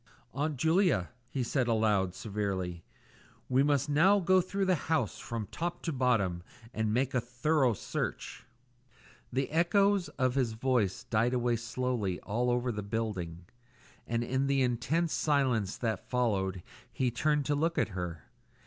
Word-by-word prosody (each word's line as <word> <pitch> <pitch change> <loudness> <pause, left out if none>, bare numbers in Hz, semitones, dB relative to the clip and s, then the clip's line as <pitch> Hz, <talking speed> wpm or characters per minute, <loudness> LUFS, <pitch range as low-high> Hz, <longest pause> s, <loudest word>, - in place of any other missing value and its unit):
"Aunt 145 +1 -1
Julia," 160 - +2 0.2
he 130 -1 -2
said 125 +1 0
aloud, 105 -5 +2
severely, 95 -5 -3 0.6
"we 130 +1 +3
must 145 0 +2
now 175 +8 +5
go 185 0 +4
through 195 +2 -2
the 185 - +3 0.2
house 140 - 0
from 115 -2 -4
top 175 +1 -4
to 165 - -2
bottom 115 -10 +1 0.3
and 110 -1 0
make 130 +4 +1
a 125 - +2
thorough 125 +2 +1
search." 115 - -4 0.9
The 135 +3 -1
echoes 195 +3 +3
of 130 -2 +2
his 125 -4 0
voice 120 -3 0
died 120 +1 +1
away 120 -1 +1
slowly 120 -5 -2
all 120 +4 -1
over 125 0 +1
the 105 -2 -4
building, 95 -5 -4 0.6
and 115 0 0
in 130 +3 0
the 135 -1 +2
intense 140 +8 0
silence 130 -10 +1
that 110 -5 -3
followed 95 -7 0 0.3
he 125 -2 0
turned 150 +4 +1
to 150 - +1
look 165 +3 0
at - - +2
her. 90 -5 -5
125 Hz, 150 wpm, -31 LUFS, 110-145 Hz, 0.9 s, now